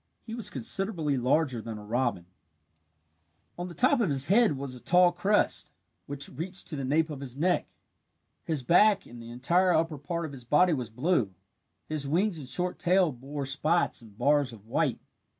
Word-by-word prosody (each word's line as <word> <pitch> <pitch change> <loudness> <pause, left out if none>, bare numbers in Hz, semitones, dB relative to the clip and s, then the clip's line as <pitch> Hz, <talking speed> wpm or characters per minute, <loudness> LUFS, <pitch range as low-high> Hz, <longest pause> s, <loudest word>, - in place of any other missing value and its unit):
He 225 - -8
was 230 -2 -2
considerably 160 - 0
larger 130 0 0
than 110 -1 -7
a 105 - -10
robin"] 120 -5 -1 1.3
On 175 +1 -5
the 175 - -10
top 260 +2 +3
of 205 - +1
his 135 +1 +2
head 210 - +4
was 135 -1 -6
a 125 - -8
tall 180 0 +4
crest, 195 +4 +1 0.3
which 140 -1 -1
reached 180 +6 -2
to 155 - -3
the 140 - -4
nape 155 +4 +1
of 145 - -6
his 135 -2 -7
neck. 180 +4 +1 0.8
His 155 -6 -1
back 200 - +4
and 120 0 -12
the 115 - -10
entire 170 +10 +2
upper 160 -2 0
part 170 +4 -4
of 155 - -7
his 135 -3 -10
body 165 +8 +3
was 125 -6 -3
blue. 125 - 0 0.5
His 150 -3 -2
wings 175 +4 0
and 135 - -8
short 180 +6 -2
tail 180 -2 +3
bore 135 +3 -6
spots 155 +5 +1
and 105 -3 -17
bars 145 -2 +2
of 110 -3 -14
white. 115 - -1
150 Hz, 185 wpm, -28 LUFS, 130-175 Hz, 1.3 s, head